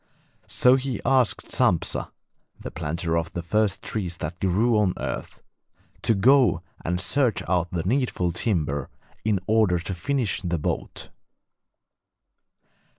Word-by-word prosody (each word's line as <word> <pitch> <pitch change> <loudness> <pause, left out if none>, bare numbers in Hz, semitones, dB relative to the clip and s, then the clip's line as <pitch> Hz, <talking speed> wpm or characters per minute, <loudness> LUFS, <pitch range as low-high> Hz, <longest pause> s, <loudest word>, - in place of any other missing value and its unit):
So 125 +1 +4
he 130 -1 -3
asked 130 -4 +2
Sampsa - - +1 0.5
(the - - -7
planter 80 +2 -2
of 85 0 -1
the 85 - -4
first 105 +2 0
trees 90 -6 -2
that 80 +3 -5
grew 105 +6 +2
on 95 -4 +1
earth) - - -5 0.6
to 115 - +2
go 125 - +4 0.2
and 90 +1 -1
search 130 +1 +1
out 90 0 +1
the 85 -2 -3
needful 105 -5 0
timber 75 - -1 0.3
in 105 -3 +1
order 105 -4 +3
to 85 +3 -4
finish 125 +3 -1
the 85 -2 -1
boat. 75 - -4
95 Hz, 130 wpm, -25 LUFS, 85-115 Hz, 0.6 s, So